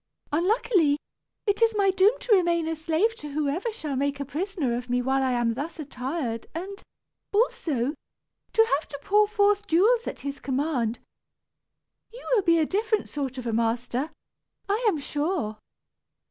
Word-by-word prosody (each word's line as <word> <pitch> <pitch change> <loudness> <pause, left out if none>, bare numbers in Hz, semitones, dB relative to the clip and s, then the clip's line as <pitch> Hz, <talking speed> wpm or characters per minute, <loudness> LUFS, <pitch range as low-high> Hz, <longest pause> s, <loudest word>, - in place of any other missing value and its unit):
Unluckily, 345 -2 +2 0.5
it 410 +1 +1
is 455 -1 +4
my 395 -1 +4
doom 390 +6 +4
to 470 - +2
remain 340 -3 +2
a 325 - -1
slave 325 +8 +1
to 295 -1 -8
whosoever 305 - -1
shall 310 -11 -4
make 280 +1 -1
a 280 - -3
prisoner 300 -4 -2
of 245 +1 -5
me 245 0 +2
whilst 265 +2 +1
I 260 -1 +1
am 240 -1 +1
thus 295 +7 -5
attired 260 -4 -4
and, 390 +4 -5 0.5
also, 305 - +1 0.6
to 450 - +6
have - - -15
to 285 - -7
pour 420 +1 +4
forth 415 -1 +2
jewels 440 +9 +3
at - - -5
his 280 0 -5
command. 260 -4 -1 1.1
You - - -12
will 450 - +5
be 335 -2 +4
a 315 - +3
different 425 +4 0
sort 270 -3 -4
of 255 - -5
a 230 - -1
master, 235 +5 0 0.6
I 415 +4 0
am 395 - +3
sure." 290 - -2
315 Hz, 165 wpm, -26 LUFS, 270-400 Hz, 1.1 s, to